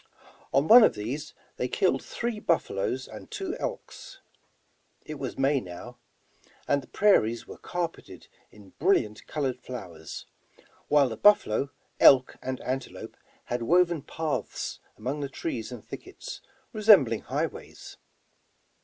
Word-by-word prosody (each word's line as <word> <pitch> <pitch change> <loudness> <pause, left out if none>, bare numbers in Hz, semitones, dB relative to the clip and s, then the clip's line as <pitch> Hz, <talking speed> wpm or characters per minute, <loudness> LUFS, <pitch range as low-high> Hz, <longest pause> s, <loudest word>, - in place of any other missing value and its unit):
On 140 +3 +2
one 240 +3 +10
of - - +4
these 135 +9 -5 0.2
they - - -1
killed - - +1
three 235 -2 -4
buffaloes - - -1
and - - -11
two 390 -4 -4
elks. - - -6 0.9
It 155 -2 -7
was 130 - -5
May 135 +1 +2
now, 90 -3 -10 0.7
and 140 0 +2
the 130 - -16
prai 205 -1 +5
ries 115 +2 -4
were - - -11
carpeted 175 -2 -5 0.2
in 100 -3 -17
brilliant 125 - +1
colored 135 -4 -2
flowers, 90 -12 -8 0.6
while 145 -2 +4
the 110 -3 -6
buffalo, 140 - +4 0.3
elk 130 -2 +7
and 130 0 -4
antelope 130 +1 -5 0.3
had 120 0 -3
woven 170 +4 +3
paths 155 +1 -4 0.2
among 130 +7 -3
the 140 -1 -3
trees 120 -5 -4
and 120 -4 -9
thickets, - - -9 0.3
resembling 195 - +5
highways. - - -5
140 Hz, 130 wpm, -27 LUFS, 120-175 Hz, 0.9 s, one